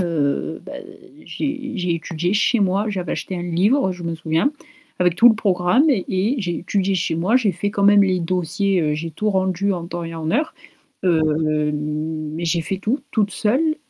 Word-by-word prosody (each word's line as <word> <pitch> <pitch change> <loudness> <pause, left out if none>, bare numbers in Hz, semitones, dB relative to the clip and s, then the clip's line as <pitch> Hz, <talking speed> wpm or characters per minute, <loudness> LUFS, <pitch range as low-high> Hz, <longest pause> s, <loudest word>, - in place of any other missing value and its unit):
heu, 160 -5 -1
bah, - - -9 0.5
j'ai 275 -2 -4
j'ai 180 -4 -1
étudié 170 +3 -2
chez 215 +2 +2
moi, 195 +2 +1
j'avais 185 -5 -3
acheté 185 - -4
un 175 - -4
livre, 190 +7 +2
je 180 -1 -10
me 165 0 -2
souviens, 165 - 0 0.5
avec 180 -1 +2
tout 240 - +8
le 225 - +5
programme 195 - +2
et 200 -1 +1
j'ai 175 -5 -2
étudié 195 +1 0
chez 170 -2 0
moi, 190 +9 +2
j'ai 220 -7 +2
fait 205 +4 -2
quand 200 - -2
même 200 0 +6
les 185 -2 +2
dossiers, 180 +2 0
heu, 150 -1 0
j'ai 165 +2 -4
tout 210 +7 -1
rendu 190 +1 0
en 170 -2 -4
temps 175 0 -5
et 165 0 -6
en 160 -1 -3
heure, 310 - 0 0.5
heu, 165 -3 +3 0.5
mais 155 +2 -3
j'ai 165 0 +1
fait 190 +4 -3
tout 225 +8 -1
toute 205 -3 +1
seule 265 - +1
185 Hz, 195 wpm, -21 LUFS, 165-205 Hz, 0.5 s, tout